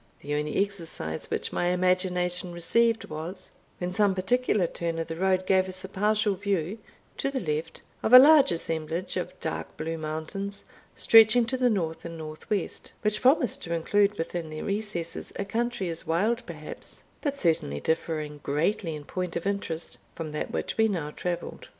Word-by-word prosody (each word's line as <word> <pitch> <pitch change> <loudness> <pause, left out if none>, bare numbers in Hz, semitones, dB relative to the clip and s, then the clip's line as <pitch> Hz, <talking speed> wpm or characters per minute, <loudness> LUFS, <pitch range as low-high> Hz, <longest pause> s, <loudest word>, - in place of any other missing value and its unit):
The 145 - -4
only 150 0 -1
exercise 170 - -3
which - - -2
my 175 - +1
imagination 180 0 +1
received 225 +7 +2
was, 170 +5 -6 0.3
when 180 0 -3
some 200 0 +3
particular 210 0 +2
turn 170 0 -3
of 165 - -1
the 165 - -3
road 185 +1 +1
gave 190 0 +3
us 185 0 -6
a - - -5
partial 210 +2 +1
view, 195 0 -2 0.4
to 275 - 0
the 275 -1 -2
left, 160 -3 -3 0.2
of 220 - 0
a 250 - +13
large 280 +1 +8
assemblage 165 +1 -2
of 180 0 -4
dark 160 - -4
blue 165 +1 -3
mountains 160 +6 -4 0.3
stretching 225 +1 +7
to 230 - -1
the 250 -1 +3
north 165 -7 -1
and 165 -1 -7
north 155 -1 -9
west, 205 -5 -2
which 210 0 +1
promised 255 -3 +3
to 170 0 -2
include 205 +5 +2
within 165 0 -3
their 155 0 -6
recesses 200 -5 -3
a 200 - -2
country 235 -1 -1
as 165 -1 -6
wild 215 +9 +1
perhaps, 155 -3 -8 0.2
but 285 -2 -1
certainly 160 - +1
differing 155 - -2
greatly 160 +4 0
in 150 - -8
point 180 0 -4
of 170 - -3
interest, 195 -5 -3 0.2
from 160 -2 -5
that 150 - -3
which - - -3
we 220 - +6
now 165 -8 -2
travelled. 175 +2 -4
180 Hz, 175 wpm, -27 LUFS, 165-205 Hz, 0.4 s, a